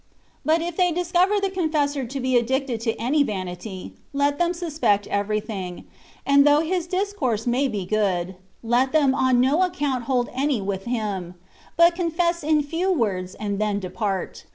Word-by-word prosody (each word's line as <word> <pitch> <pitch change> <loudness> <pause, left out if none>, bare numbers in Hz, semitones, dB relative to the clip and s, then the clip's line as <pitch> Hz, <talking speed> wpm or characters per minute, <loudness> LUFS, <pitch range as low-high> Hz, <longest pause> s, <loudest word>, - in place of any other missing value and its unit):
But 320 +1 +2
if 345 -1 -5
they 360 -2 +3
discover 360 +4 +2
the 395 -1 -1
confessor 300 -6 0
to 270 +3 -5
be 260 0 0
addicted 245 0 0
to 225 -1 -1
any 265 +7 +2
vanity, 185 -4 -4 0.2
let 285 +1 +1
them 345 0 +2
suspect 270 - 0
everything; 200 -3 -3 0.4
and 280 0 +5
though 290 +1 +5
his 345 +1 -1
discourse 360 - -1
may 250 +3 +1
be 205 -7 -3
good, 190 -3 0 0.3
let 245 +4 +1
them 285 -4 +4
on 260 -2 +2
no 270 +7 +3
account 290 -9 -1
hold 250 -2 0
any 270 -1 0
with 195 -1 -4
him; 205 -7 -3 0.4
but 340 0 +6
confess 340 -1 0
in 305 0 +2
few 335 +6 -1
words 195 - -1
and 205 -2 -3
then 210 -1 0
depart. 190 +1 -4
260 Hz, 165 wpm, -23 LUFS, 210-325 Hz, 0.4 s, but